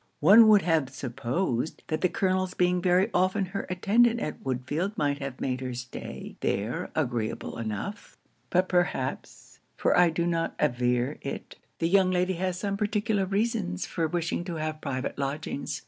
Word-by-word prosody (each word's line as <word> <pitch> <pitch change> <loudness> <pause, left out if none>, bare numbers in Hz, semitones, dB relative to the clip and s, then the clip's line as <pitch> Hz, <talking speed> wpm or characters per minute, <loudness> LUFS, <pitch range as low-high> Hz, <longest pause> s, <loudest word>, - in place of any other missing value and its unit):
One 210 +8 +8
would 210 -2 +6
have 160 -6 +2
supposed 130 +2 -2
that 155 - -2
the 185 - +3
Colonel's 185 0 0
being 180 0 +2
very 185 +4 +3
often 185 +2 +2
her 200 - -3
attendant 225 +6 +3
at 150 - -5
Woodfield 140 - -2
might 145 -1 0
have 135 -2 -6
made 130 -1 -2
her 130 -1 -4
stay 125 +1 -7
there 105 +4 -2
agreeable 120 -6 -2
enough; 115 - -5 0.3
but 185 +1 +2
perhaps 175 -7 -2 0.2
(for - - +2
I 175 -1 +6
do 170 +1 -1
not 165 -1 -1
aver 125 0 +1
it) 140 - -6 0.2
the 165 - 0
young 190 +1 +4
lady 180 +1 +1
has 185 0 -2
some 200 +1 -2
particular 210 -1 0
reasons 195 - -1
for 165 -2 -1
wishing 170 +1 -2
to 175 -2 -4
have 155 0 -3
private 130 -1 -3
lodgings. 140 +1 -3
170 Hz, 165 wpm, -27 LUFS, 135-185 Hz, 0.3 s, One